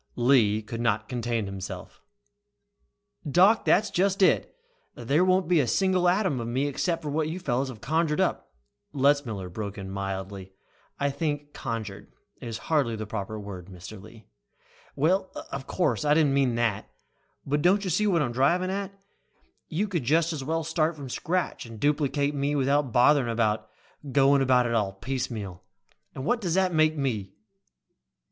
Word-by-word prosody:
Lee 120 -4 +3
could 115 +2 -6
not 110 -2 0
contain 120 -3 -2
himself. 95 -1 -7 1.3
"Doc, 190 +9 +5
that's 215 +2 +3
just 195 +2 +2
it! 185 - +2 0.4
There 140 +8 +1
won't 185 -1 +2
be 175 -2 +4
a 135 - +2
single 185 - +2
atom 185 - +1
of 115 - -4
me 130 +4 0
except 165 +3 -2
what 150 +1 -1
you 170 +3 -4
fellows 135 -5 -1
have 115 -5 -10
conjured 155 +4 0
up - - -1 0.2
" 105 +4 -51
Letzmiller 135 -9 +1
broke 100 0 -5
in 95 -1 -6
mildly. 95 0 -5 0.5
"I 140 0 +1
think 145 -1 -3
'conjured' 110 -4 -6 0.3
is 115 -2 -5
hardly 140 -5 0
the 110 0 -5
proper 110 0 -5
word, 95 -3 -8
Mr. 95 +2 -10
Lee." 110 +1 -15 0.7
"Well, 185 +6 +1 0.2
of 135 -1 -5
course, 140 - 0
I 150 0 +3
didn't 150 -3 +3
mean 135 -4 +2
that. 115 -3 -1 0.6
But 145 +2 0
don't 190 +5 +3
you 185 - -2
see 210 +6 +2
what 170 -6 +2
I'm 120 - -2
driving 170 +9 +2
at? 195 0 -3 0.8
You 190 +7 -1
could 175 -8 -2
just 160 +6 +2
as 145 -4 -4
well 160 +3 -1
start 160 0 0
from 140 -3 -8
scratch 180 -6 -2
and 115 -2 -10
duplicate 145 +1 +1
me 145 +1 -1
without 140 -1 +1
bothering 125 +1 +4
about 110 -2 0 0.4
going 140 0 +4
about 125 -2 +4
it 105 -5 -1
piecemeal. 110 -7 -4 0.5
And 135 - -5
what 245 +4 +1
does 175 -4 -1
that 190 -1 +2
make 155 0 +3
me?" 110 -9 -2
135 Hz, 165 wpm, -27 LUFS, 110-160 Hz, 1.3 s, Doc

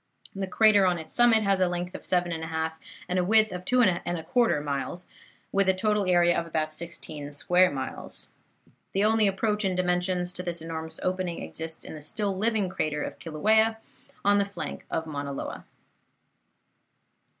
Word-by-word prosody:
The 195 -1 -3
crater 205 0 +5
on 180 -1 +2
its 160 -1 -6
summit 235 -2 +5
has 195 -1 +2
a 185 - +4
length 175 +1 -3
of - - -8
7 175 -1 +1
1/2 160 0 -2 0.4
and 180 +1 0
a - - +2
width 215 +2 +4
of 180 0 -6
2 250 - +2
1/4 175 +1 +2
miles, 145 +5 -3 0.5
with 195 -1 +2
a 190 - +4
total 210 0 +1
area 175 -1 +4
of 170 - -1
about 155 -1 -1
sixteen 155 -3 -7
square 180 +6 +3
miles. 135 -2 -4 0.6
The 195 - +2
only 215 0 +4
approach 210 +2 0
in 190 -2 0
dimensions 180 0 0
to 180 - -4
this 175 -2 -4
enormous 160 0 -6
opening 185 -2 -2
exists 160 0 -6
in - - -7
the 155 - -8
still 200 +5 -2
living 215 0 +1
crater 155 -4 -2
of - - -6
Kilauea, 220 +8 +2 0.5
on 205 0 +5
the 200 - +2
flank 200 - -6
of 160 - -2
Mauna 140 -2 -4
Loa. - - -6
180 Hz, 170 wpm, -27 LUFS, 160-200 Hz, 0.6 s, crater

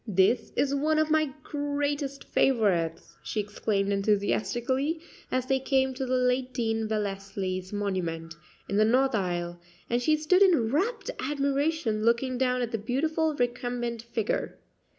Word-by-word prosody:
"This 195 +4 +2
is 280 -1 +1
one 305 +2 +1
of 310 0 +2
my 310 -2 +3
greatest 285 -1 -2
favorites," 200 -11 +1
she 215 - -3
exclaimed 205 -1 -1
enthusiastically, 240 +9 0 0.3
as 255 -1 0
they 265 0 +1
came 265 0 +1
to 260 0 -3
the 255 - +1
late 250 0 +1
Dean 225 -2 0
Wellesley's 195 -3 -3
monument, 180 -5 -2 0.3
in 200 - -1
the 215 - +5
north 260 +4 +3
aisle; 175 -3 -2 0.3
and 240 +1 +2
she 310 +5 +3
stood 340 +5 +3
in 320 - +4
rapt 420 - 0
admiration 280 -3 0
looking 245 +2 +1
down 250 -1 +1
at 235 - -3
the 225 - -2
beautiful 310 +7 0
recumbent 245 -2 -2
figure. 230 -2 -2
245 Hz, 145 wpm, -28 LUFS, 210-280 Hz, 0.3 s, the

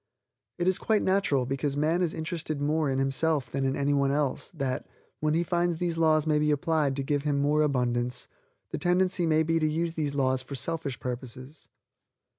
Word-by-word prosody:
It 175 0 -1
is 185 0 +3
quite 215 -2 +1
natural, 185 -9 +2
because 135 +2 -2
man 160 +4 +1
is 170 -3 0
interested 160 -2 -4
more 150 +1 +1
in 135 - 0
himself 135 0 0
than 135 0 -1
in 135 0 0
any 140 0 +1
one 140 -1 +2
else, 145 -2 -1
that, 135 -7 -3 0.3
when 155 0 +1
he 170 - +2
finds 175 -1 0
these 170 -1 -1
laws 155 -2 +3
may 155 -1 +2
be 150 0 +1
applied 150 -2 +1
to 140 - -2
give 145 +1 0
him 145 -1 0
more 150 +2 +2
abundance, 125 -4 0 0.4
the - - -3
tendency 180 -1 +1
may 160 0 +3
be 165 +1 +1
to 155 - +1
use 165 +2 -1
these 150 -3 -2
laws 130 -2 +1
for 135 +2 -7
selfish 155 -2 -3
purposes. 130 +3 -7
150 Hz, 200 wpm, -28 LUFS, 135-165 Hz, 0.4 s, is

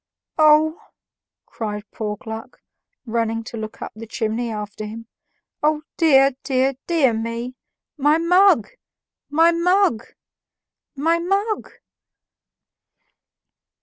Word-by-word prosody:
"Oh!" 310 +1 +5 0.6
cried 210 -2 -5
poor 210 -1 -4
Gluck, 225 +5 -8 0.5
running 225 -1 -1
to 225 - -9
look 215 0 -6
up - - -6
the 225 +1 -9
chimney 225 +1 -2
after 210 -1 -6
him, 220 +2 -7 0.6
"O 300 0 +1
dear, 275 -5 +5
dear, 265 0 +1
dear 305 -8 +3
me! 230 +2 -4 0.4
My 295 +2 +3
mug! 340 - +4 0.6
my 325 +3 +4
mug! 340 - +2 0.9
my 325 +4 +1
mug!" 395 +5 -1
265 Hz, 100 wpm, -21 LUFS, 225-325 Hz, 0.9 s, Oh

